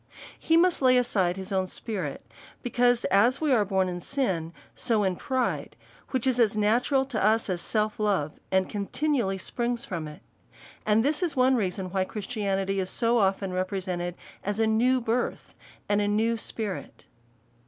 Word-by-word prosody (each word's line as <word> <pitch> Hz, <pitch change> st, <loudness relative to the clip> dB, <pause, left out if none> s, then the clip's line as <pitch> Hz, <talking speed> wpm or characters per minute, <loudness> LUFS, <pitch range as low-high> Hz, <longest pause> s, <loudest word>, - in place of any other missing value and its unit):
He 325 Hz, -, +3 dB
must 355 Hz, -1 st, +3 dB
lay 255 Hz, -1 st, +5 dB
aside 195 Hz, -7 st, +1 dB
his 190 Hz, 0 st, -5 dB
own 190 Hz, -1 st, 0 dB
spirit, 210 Hz, +1 st, -5 dB, 0.4 s
because, 245 Hz, 0 st, +2 dB
as 235 Hz, +6 st, +4 dB
we 310 Hz, -2 st, +1 dB
are 220 Hz, -4 st, +4 dB
born 190 Hz, -2 st, +1 dB
in 175 Hz, -1 st, -4 dB
sin, 180 Hz, -, -1 dB, 0.2 s
so 225 Hz, -4 st, 0 dB
in 190 Hz, -2 st, +1 dB
pride, 260 Hz, +6 st, -2 dB, 0.3 s
which 260 Hz, -2 st, -1 dB
is 255 Hz, -2 st, +2 dB
as 220 Hz, -2 st, +3 dB
natural 245 Hz, +6 st, +2 dB
to 240 Hz, -7 st, -2 dB
us 215 Hz, -1 st, +2 dB
as 175 Hz, -1 st, -2 dB
self 215 Hz, -1 st, -1 dB
love, 195 Hz, -8 st, 0 dB
and 190 Hz, 0 st, +2 dB
continually 215 Hz, 0 st, -1 dB
springs 240 Hz, +5 st, -3 dB
from 170 Hz, -, -4 dB
it. 150 Hz, 0 st, -11 dB, 0.6 s
And 220 Hz, +3 st, +3 dB
this 300 Hz, +4 st, +1 dB
is 345 Hz, -4 st, -1 dB
one 260 Hz, 0 st, +4 dB
reason 190 Hz, -4 st, -2 dB
why 190 Hz, 0 st, +1 dB
Christianity 195 Hz, -2 st, -2 dB
is 185 Hz, -1 st, -2 dB
so 235 Hz, +3 st, +2 dB
often 195 Hz, -1 st, +1 dB
represented 185 Hz, -2 st, -2 dB, 0.3 s
as 205 Hz, +2 st, -2 dB
a 225 Hz, -, +4 dB
new 245 Hz, +4 st, +3 dB
birth, 235 Hz, +2 st, -2 dB, 0.3 s
and 205 Hz, 0 st, +2 dB
a 205 Hz, -, +1 dB
new 220 Hz, +3 st, +2 dB
spirit. 220 Hz, -3 st, -5 dB
215 Hz, 170 wpm, -27 LUFS, 190-245 Hz, 0.6 s, lay